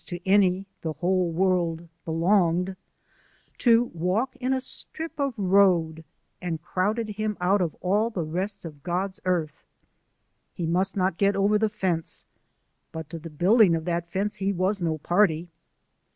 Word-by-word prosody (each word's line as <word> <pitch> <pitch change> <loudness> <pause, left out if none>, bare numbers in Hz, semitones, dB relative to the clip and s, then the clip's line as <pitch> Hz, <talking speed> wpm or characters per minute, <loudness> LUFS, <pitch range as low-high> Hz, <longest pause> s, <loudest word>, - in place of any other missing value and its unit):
to 175 - -5
any, 190 -1 +3 0.2
the 160 -1 -3
whole 180 +3 +1
world 170 -1 0 0.2
belonged, 175 +2 +2 0.8
to 235 0 +4
walk 185 +10 -1
in 255 +1 -1
a 265 - +2
strip 315 +5 -6
of 275 -3 0
road 180 -5 +3 0.4
and 165 -3 -4
crowded 210 +6 -1
him 210 0 -3
out 190 +3 +2
of 170 -4 -1
all 205 +5 +2
the 190 -7 -3
rest 185 +5 -4
of 150 -3 -9
God's 185 +3 -2
earth. 170 -5 -1 0.9
He 175 - -3
must 185 +4 +1
not 185 -2 0
get 200 0 +3
over 205 +2 +3
the 220 0 +2
fence: 185 -6 -2 0.7
but 160 -1 -7
to 165 - -5
the 165 +1 -9
building 180 +4 +4
of 160 -1 -4
that 170 -1 -2
fence 200 +4 -2
he 195 0 0
was 190 +1 0
no 160 -2 0
party. 175 0 +1
185 Hz, 155 wpm, -26 LUFS, 170-205 Hz, 0.9 s, to